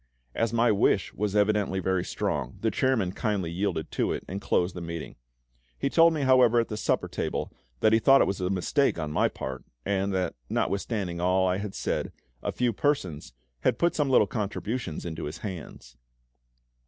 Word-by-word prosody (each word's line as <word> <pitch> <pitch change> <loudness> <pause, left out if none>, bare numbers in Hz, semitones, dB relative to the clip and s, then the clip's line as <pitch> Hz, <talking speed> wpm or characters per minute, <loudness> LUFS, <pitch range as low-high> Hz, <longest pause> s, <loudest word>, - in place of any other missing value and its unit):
As 115 -1 0
my 115 0 +3
wish 100 - +2
was 105 0 -2
evidently 105 -2 +2
very 95 -1 0
strong, - - -3
the 110 - +1
chairman 115 -5 +1
kindly 100 -5 -2
yielded 90 -3 -2
to - - 0
it, - - -5
and 95 +2 -5
closed 90 -1 +1
the 90 - -6
meeting. 85 -1 -6 0.6
He 140 - -1
told 165 0 +6
me, 150 - -1
however, 125 -3 +5
at 115 - 0
the 105 - -3
supper 105 - 0
table, - - -3 0.3
that 110 - +4
he 110 - +5
thought 135 +4 +6
it - - +5
was 95 0 -2
a 90 - 0
mistake 95 +8 +1
on 75 -2 -3
my - - +3
part, 65 -1 -6 0.2
and 100 0 0
that, 95 -2 -1 0.2
notwithstanding 100 -4 -1
all 95 +1 +3
I 90 0 +1
had 100 -1 -5
said, - - -2 0.3
a - - -2
few 125 -2 0
persons 90 - -1 0.3
had - - +1
put 170 0 +2
some 145 -3 0
little 130 - +5
contributions 105 - -3
into 80 -2 -4
his 75 +3 -5
hands. 90 -9 -8
100 Hz, 190 wpm, -27 LUFS, 90-115 Hz, 0.6 s, told